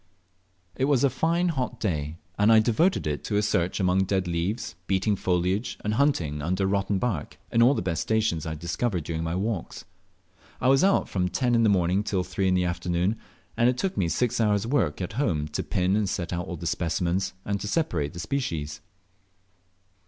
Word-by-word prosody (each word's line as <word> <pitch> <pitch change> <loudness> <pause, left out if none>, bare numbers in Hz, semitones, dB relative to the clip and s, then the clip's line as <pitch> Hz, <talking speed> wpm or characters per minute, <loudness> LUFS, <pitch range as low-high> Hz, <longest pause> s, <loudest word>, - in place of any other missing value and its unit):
It 130 - +1
was 140 -3 +2
a 140 - +4
fine 170 +7 +1
hot 125 -6 -2
day, 75 -6 -2 0.2
and 105 +2 +4
I 110 - +7
devoted 125 - +2
it 75 -1 -2
to 105 - 0
a 105 - +2
search 90 -3 0
among 95 0 +2
dead 95 -1 0
leaves, 85 +7 -2
beating 100 +2 +1
foliage, 90 +4 0
and 105 - 0
hunting 90 - +1
under 90 +5 0
rotten 100 +1 0
bark, 100 -8 -2
in 115 - +3
all 130 +4 +6
the - - -2
best 85 -2 -1
stations 110 -8 0
I 80 - -2
had 75 - -8
discovered 85 +2 -1
during 80 +1 -3
my 80 +1 -2
walks. 100 -1 -3 0.7
I 130 - +2
was 135 +3 +5
out 195 +1 +3
from 90 -2 -1
ten 120 +8 0
in 115 - +4
the 110 - +4
morning 95 0 +2
till 95 -3 -1
three 95 +1 -1
in 95 - +3
the 90 -1 +2
afternoon, 90 +3 0 0.4
and 120 +1 +4
it 125 - 0
took 190 +7 -1
me 85 - 0
six 125 +4 0
hours' 105 -1 +2
work 115 - 0
at 90 - -5
home 80 - 0
to 75 - -2
pin 95 +1 0
and 105 -2 +1
set 90 -2 -3
out 90 0 -3
all 90 - -5
the 85 - -7
specimens, 85 +3 -1
and 100 -1 -2
to - - -4
separate 85 - -1
the 85 - -8
species. 80 - -3
95 Hz, 205 wpm, -26 LUFS, 85-115 Hz, 0.7 s, I